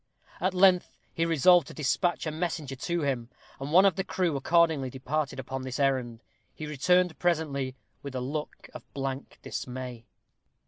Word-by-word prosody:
At 185 +1 0
length 185 -1 +4 0.2
he 165 0 0
resolved 170 +2 +5
to - - -10
despatch 170 +5 0
a 155 - -1
messenger 155 -4 -3
to 170 +6 -2
him, 130 -5 -1 0.3
and 135 +2 -5
one 185 +4 +7
of 195 -4 +3
the 190 - 0
crew 180 -5 0
accordingly 160 -1 +3
departed 140 +3 -2
upon 130 +1 -4
this 130 +1 -5
errand. 130 -4 0 0.3
He 155 - -6
returned 180 +4 +2
presently 145 -7 0 0.3
with 140 -2 -7
a - - -1
look 145 +4 -5
of - - -9
blank 135 0 -4
dismay. 125 -2 -6
150 Hz, 165 wpm, -28 LUFS, 130-170 Hz, 0.3 s, one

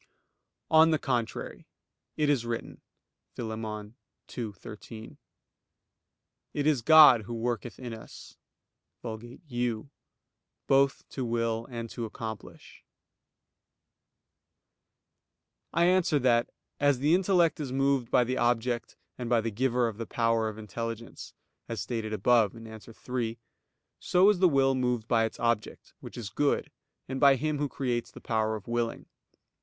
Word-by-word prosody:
On 160 0 +7
the 160 - +3
contrary, 120 -5 -3 0.5
It 150 - +2
is 140 -5 +2
written 115 -1 -5 0.5
(Phil. 115 -2 -4
2:13): 110 0 -8 1.4
"It 145 - -1
is 150 -5 +3
God 150 -3 +8
who 120 - -5
worketh 120 0 -3
in 125 -3 -7
us 110 - -11 0.7
[Vulgate 115 +5 -8
'you'] 120 0 -3 0.7
both 135 0 +2
to 130 - -4
will 115 -1 -1
and 115 -2 -5
to 120 - -4
accomplish." 110 -1 -9 2.9
I 170 +2 +3
answer 180 -4 +3
that, 120 -3 +2 0.3
As 145 -2 +3
the 145 +5 +2
intellect 180 -3 +3
is 140 -4 -4
moved 135 -2 +1
by 125 - +4
the 130 +2 -2
object 120 0 0 0.2
and 120 -2 -4
by 120 -1 +4
the 115 0 -2
Giver 125 +2 +1
of 110 -2 -5
the 115 - -4
power 115 -1 +1
of 110 - -9
intelligence, 115 +2 -7 0.3
as 115 -2 -3
stated 110 +2 -3
above 110 0 +3
(A. 110 -1 -10
3), 115 +1 -5 0.6
so 185 +3 +4
is 200 - -2
the 185 -1 +5
will 135 -2 +3
moved 125 -3 -1
by 115 -2 +3
its 110 - -6
object, 115 -2 -2
which - - -10
is 105 -4 -6
good, 145 +6 0 0.4
and 130 0 -4
by 140 -1 +6
Him 150 +2 -2
who 145 -1 -1
creates 120 -4 -2
the - - -12
power 110 -1 -1
of 105 - -9
willing. 120 -1 -2
120 Hz, 140 wpm, -28 LUFS, 115-135 Hz, 2.9 s, God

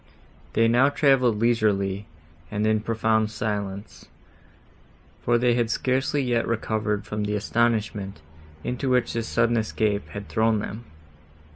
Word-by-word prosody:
They 115 0 +4
now 120 +4 +4
travelled 135 -6 +3
leisurely, 105 -4 +1 0.4
and 105 +3 -1
in 110 0 +3
profound 110 0 +1
silence; 105 -2 -4 1.1
for 120 0 +2
they 120 0 +3
had 120 -1 +1
scarcely 130 +4 0
yet 120 -2 0
recovered 110 -2 -1
from 105 0 -3
the 105 0 -1
astonishment, 105 -4 0 0.4
into 125 +2 -2
which 125 -1 +2
this 115 -1 -2
sudden 115 0 +2
escape 110 -2 -1
had 100 0 -7
thrown 110 0 +2
them. 105 +3 -5
110 Hz, 130 wpm, -25 LUFS, 105-120 Hz, 1.1 s, They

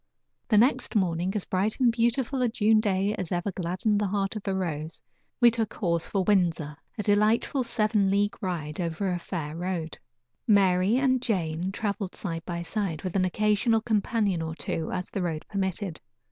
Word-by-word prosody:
The 215 - +3
next 245 +2 +3
morning 180 -1 +1
as 205 - -1
bright 195 +6 -1
and 250 -2 +5
beautiful 240 +3 0
a 245 - +3
June 220 -1 +3
day 200 -1 +1
as 185 -3 -4
ever 180 +3 -1
gladdened 185 +4 0
the 205 - +1
heart 195 +1 -1
of 210 -1 -6
a 195 - +1
rose 160 -4 -3 0.4
we 240 -1 +7
took 225 -2 -2
horse 170 -4 0
for 195 -2 0
Windsor; 170 -7 +1 0.2
a 210 - -2
delightful 215 +6 +2
seven 215 -4 +1
league 205 +1 +1
ride 160 -5 -3
over 175 +3 -1
a 175 - -1
fair 160 -4 -5
road. 170 -2 -3 0.5
Mary 195 0 +4
and 260 -2 +2
Jane 180 -5 -1
traveled 200 -2 -3
side 165 -4 -4
by 170 -1 -3
side, 175 -4 -3
with 185 -1 -4
an 185 -1 +3
occasional 210 +4 +2
companion 210 -4 0
or 160 0 -4
two, 160 -1 -3
as 180 0 -4
the 195 - -2
road 165 -3 -3
permitted. 190 -3 -3
195 Hz, 180 wpm, -27 LUFS, 175-215 Hz, 0.5 s, we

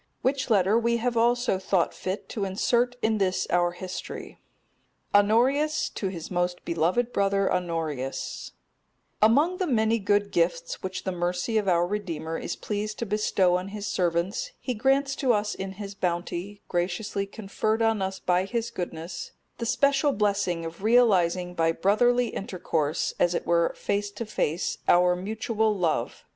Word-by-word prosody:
Which 260 0 0
letter 205 +1 +4
we 235 0 +1
have 240 +1 -1
also 240 -3 +2
thought 190 -2 +1
fit 190 +2 -4
to 210 - -3
insert 235 +6 +1
in 220 -1 +2
this 185 -1 +1
our 175 0 +2
history: 185 +1 -7 0.7
"Honorius 255 +10 +3
to 195 - -3
his 175 -3 -6
most 175 0 -1
beloved 180 +9 0
brother 195 0 +2
Honorius: 165 -7 -3 0.7
Among 290 +12 +4
the 370 - -1
many 225 -3 +2
good 205 0 +1
gifts 170 0 0
which 190 0 -4
the 190 - -2
mercy 180 +5 0
of 205 - -4
our 175 -1 +3
Redeemer 170 -5 -3
is - - -4
pleased 210 0 -4
to 235 - -3
bestow 195 -3 +2
on 180 +1 -5
His 205 0 -6
servants 185 - -1
He 255 - -3
grants 270 +4 +2
to 255 -3 +3
us 210 0 0
in 190 0 -5
His 200 0 -7
bounty, 180 +2 -3
graciously 190 +3 -2
conferred 215 +2 -1
on 225 -2 +2
us 190 0 -2
by 180 0 +1
His 230 +2 -2
goodness, 170 -1 -6 0.3
the 235 - -2
special 280 +3 +3
blessing 200 -5 0
of 165 +2 -8
realizing 185 -6 +3
by 165 -1 +2
brotherly 240 +7 +3
intercourse, 165 -5 -2
as 175 0 +3
it - - -2
were 170 0 +2
face 205 0 -1
to 205 +3 -6
face, 175 -5 -1
our 180 0 +5
mutual 220 +2 -1
love. 170 -4 -1
200 Hz, 155 wpm, -26 LUFS, 175-225 Hz, 0.7 s, our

